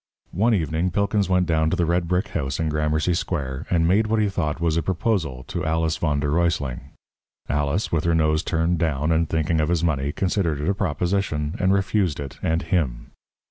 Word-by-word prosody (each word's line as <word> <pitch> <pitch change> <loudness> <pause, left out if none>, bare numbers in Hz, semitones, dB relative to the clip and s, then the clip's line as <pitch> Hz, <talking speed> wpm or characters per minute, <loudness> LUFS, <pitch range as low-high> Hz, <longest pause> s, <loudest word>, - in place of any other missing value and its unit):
One 110 +5 +3
evening 80 0 0
Pilkins 100 +2 0
went 90 -1 +3
down 80 -2 +1
to - - 0
the 85 - +1
red 85 +1 0
brick 90 +4 0
house 70 -5 -3
in 80 -1 0
Gramercy 75 +3 0
Square, 75 -7 -3
and 85 -2 +2
made 105 +5 +3
what 110 0 +1
he 105 -1 +2
thought 80 -6 -2
was 85 -2 +1
a 85 - +2
proposal 85 - -1
to - - -3
Alice 80 0 0
v. 75 -3 0
d. 70 - -2
R. 85 +4 +2 1.0
Alice, 75 - -1
with 80 -1 0
her 85 -1 +2
nose 80 -1 +2
turned 85 0 0
down, 75 -2 0
and 80 0 +1
thinking 80 0 +1
of 75 - 0
his 85 -2 +1
money, 70 -4 0
considered 90 -4 0
it 75 - -2
a 100 - +3
proposition, 90 -3 -1
and 95 0 +2
refused 95 -4 +1
it 70 -2 -7
and 80 +1 0
him. 65 -11 -1
80 Hz, 205 wpm, -23 LUFS, 75-90 Hz, 1.0 s, One